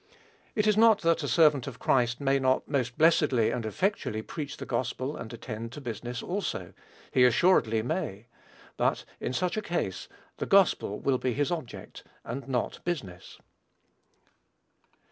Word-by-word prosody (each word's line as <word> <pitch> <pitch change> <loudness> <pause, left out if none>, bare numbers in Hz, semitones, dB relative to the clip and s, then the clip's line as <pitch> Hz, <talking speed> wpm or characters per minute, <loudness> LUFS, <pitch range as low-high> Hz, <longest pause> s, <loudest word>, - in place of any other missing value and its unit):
It 210 - +1
is 215 -1 +4
not 225 -1 +6
that 165 -1 +2
a - - -3
servant 150 -6 +4
of 130 -3 -7
Christ 120 -2 +1
may 135 -1 +2
not 130 0 +1
most 125 -4 -1
blessedly 150 -7 +4
and 115 -3 -3
effectually 110 - -1
preach 145 +1 -6
the - - -6
gospel 130 +3 -2
and 110 - -7
attend 115 -1 -6
to 150 - -7
business 120 -1 -5
also: 110 - -3 0.4
he 125 - +4
assuredly 125 -5 +4
may; 120 - -3 0.5
but, - - 0
in - - -3
such 180 +9 -1
a - - 0
case, 170 - -3 0.3
the - - -3
gospel 190 - +3
will 130 -2 +1
be 125 - -1
his 145 +5 0
object, 160 -9 -6 0.2
and 130 +2 -5
not 125 -3 -2
business. 105 - -5
130 Hz, 155 wpm, -28 LUFS, 115-165 Hz, 0.5 s, not